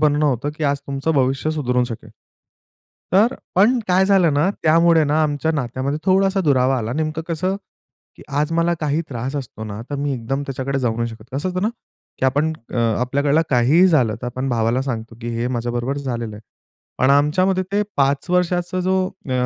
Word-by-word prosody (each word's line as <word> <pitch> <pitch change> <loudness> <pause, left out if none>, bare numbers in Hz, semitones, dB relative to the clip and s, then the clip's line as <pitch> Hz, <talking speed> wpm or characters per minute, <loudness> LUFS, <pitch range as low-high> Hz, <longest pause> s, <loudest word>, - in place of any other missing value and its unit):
बनणं 150 0 +3
होतं, 140 +1 0
की 155 - -3
आज 140 0 +1
तुमचं 140 +3 -2
भविष्य 135 +3 +1
सुधारू 125 -5 0
शकेल. 115 -2 -8 1.0
तर 215 +6 +4
अ, - - -13 0.2
पण 220 +7 +4
काय 185 +1 +4
झालं 185 -6 +4
ना, 150 +7 +2
त्यामुळे 165 0 +4
ना 150 +2 +2
आमच्या 150 +1 0
नात्यामध्ये 135 +1 -2
थोडासा 195 +1 +3
दुरावा 135 -4 +2
आला. 115 +1 -3
नेमकं 155 +2 -2
कसं, 185 +4 -1 0.6
की - - -13 0.2
आज 150 +2 0
मला 170 +1 +2
काही 150 +1 0
त्रास 130 +2 -4
असतो 125 -5 -6
ना, 105 0 -6
तर 145 - -2
मी 140 0 -1
एकदम 135 +4 -3
त्याच्याकडे 135 0 -2
जाऊ 115 -3 -1
नाही 115 0 -1
शकत. 110 -2 -11
कसं 145 +7 -2
होतं 185 +1 -2
ना, 215 - +2 0.5
की - - -1
आपण 145 +4 +1 0.2
आपल्याकडलं 125 +6 +1
काहीही 135 +9 +5
झालं, 130 -11 +3
तर - - -3
आपण 130 +2 -3
भावाला 120 +2 +1
सांगतो, 115 -4 -5
की 120 - -5
हे 120 +1 -1
माझ्याबरोबर 120 +2 -2
झालेलं 120 -5 -4
आहे. - - -11 0.6
पण 130 +2 +3
आमच्यामध्ये 185 +7 +3
ते 205 +1 +2
5 140 +2 +1
वर्षांचा 180 0 0
जो 185 +1 +1
अ, 160 -9 -9
140 Hz, 190 wpm, -20 LUFS, 125-165 Hz, 1.0 s, काहीही